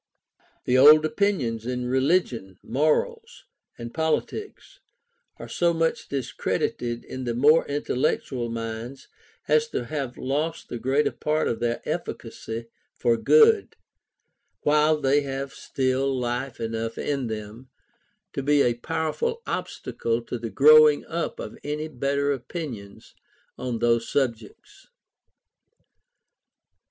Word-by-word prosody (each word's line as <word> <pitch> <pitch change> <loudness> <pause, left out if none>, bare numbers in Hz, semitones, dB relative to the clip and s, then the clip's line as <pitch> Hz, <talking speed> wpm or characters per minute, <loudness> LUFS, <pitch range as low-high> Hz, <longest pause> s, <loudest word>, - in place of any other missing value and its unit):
The 125 +1 +3
old 155 +3 +8
opinions 135 - 0
in 125 0 -2
religion, 130 - 0
morals, 450 - -1 0.3
and 120 0 -8
politics, 160 - -3 0.6
are - - -9
so 170 -1 +1
much 165 0 -1
discredited 120 -2 -2
in 130 0 -6
the 120 -1 -2
more 150 +6 +5
intellectual 130 -3 -1
minds 115 +3 -6 0.4
as 150 +1 +3
to 125 - -3
have 135 -2 -4
lost 150 +5 -2
the 120 - -5
greater 135 +4 +1
part 155 +1 -1
of 115 - -2
their 120 0 -1
efficacy 115 +1 -5 0.3
for 120 - +2
good, 445 - +4 0.9
while 150 +1 +3
they 140 +1 +3
have 135 0 -5
still 130 0 -1
life 120 +1 -3
enough 115 0 -3
in 140 -4 -2
them 110 +3 -7 0.6
to - - -2
be 145 +1 +3
a 120 - +2
powerful 165 - -2
obstacle 115 0 -3
to 120 +1 -5
the 115 - -5
growing 150 +6 +6
up 170 0 -3
of - - -7
any 150 +1 -3
better 140 0 -1
opinions 125 - -7 0.4
on 125 -2 -3
those 115 0 +1
subjects. 130 - -3
135 Hz, 120 wpm, -25 LUFS, 120-155 Hz, 0.9 s, old